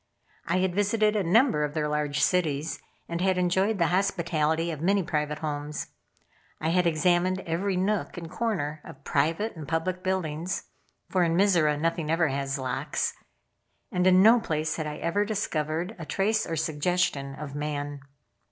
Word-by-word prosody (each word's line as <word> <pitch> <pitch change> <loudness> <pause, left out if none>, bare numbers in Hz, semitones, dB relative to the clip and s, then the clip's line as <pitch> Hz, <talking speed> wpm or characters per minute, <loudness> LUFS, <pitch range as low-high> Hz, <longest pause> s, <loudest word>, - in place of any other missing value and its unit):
I - - +1
had 185 -1 +1
visited 210 +2 +2
a 210 - +2
number 200 - +3
of 150 +1 -3
their 150 -1 0
large 150 -1 -1
cities, 160 -4 +1 0.3
and 170 +1 -3
had 190 0 +2
enjoyed 190 +4 +2
the 170 -3 +2
hospitality 170 -4 +1
of 155 -2 -6
many 195 +3 +2
private 150 -2 -1
homes. 150 -1 -4 0.7
I 160 - -1
had 180 +1 +3
examined 175 +3 +2
every 180 +3 -1
nook 195 +1 -1
and 170 -1 -6
corner 155 -7 -2
of 135 - -12
private 165 +12 0
and 155 -3 -8
public 175 +3 -1
buildings, 185 -2 -2 0.4
(for 185 - +1
in 165 -1 +1
Mizora 170 -7 +3
nothing 165 -1 -1
ever 165 -1 +2
has 135 +1 -2
locks) 130 +2 -2 0.8
and 180 -2 +2
in 185 0 +6
no 230 +3 +7
place 160 -6 -1
had 155 -2 -2
I 150 0 -5
ever 185 +5 0
discovered 175 -3 -2
a 165 - -6
trace 215 +3 +1
or 165 - -2
suggestion 155 -3 0
of 140 -1 -7
man. 145 -1 -3
165 Hz, 165 wpm, -27 LUFS, 150-185 Hz, 0.8 s, no